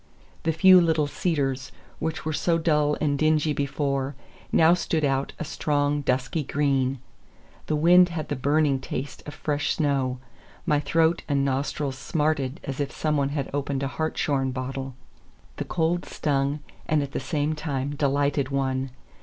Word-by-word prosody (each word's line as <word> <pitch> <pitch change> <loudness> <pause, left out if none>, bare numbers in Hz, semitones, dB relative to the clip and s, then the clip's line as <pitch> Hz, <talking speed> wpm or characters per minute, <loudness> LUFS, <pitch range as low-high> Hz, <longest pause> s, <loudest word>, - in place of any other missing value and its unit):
The 160 - +1
few 185 +3 +7
little 160 -3 +2
cedars, 140 -4 -1 0.3
which 160 -1 -3
were 155 - -1
so 165 +3 +1
dull 150 -3 +2
and 145 -2 0
dingy 155 -1 +2
before, 140 -1 -1 0.4
now 160 +1 +6
stood 165 -3 0
out 135 0 0
a - - -4
strong, 145 -1 0
dusky 135 +3 0
green. 135 -2 +1 0.7
The 155 - +1
wind 175 +4 +6
had 160 -3 -4
the - - -1
burning 145 +1 +2
taste 135 +1 -5
of 145 - -7
fresh 145 -1 -1
snow; 135 -4 0 0.5
my 150 - +3
throat 160 +3 +2
and 140 -1 +2
nostrils 135 0 -2
smarted 150 -2 -1
as 135 0 -5
if 140 -1 -1
some 155 -1 -1
one 140 -1 +1
had 140 -2 -3
opened 140 -1 -2
a - - 0
hartshorn 140 -3 -1
bottle. 130 0 -5 0.6
The - - -3
cold 175 +1 0
stung, 140 0 -1 0.3
and 150 -2 +2
at 140 - -6
the - - -2
same 145 +3 -1
time 145 -2 -3
delighted 140 -1 +1
one. 135 -1 -1
145 Hz, 160 wpm, -25 LUFS, 135-155 Hz, 0.7 s, few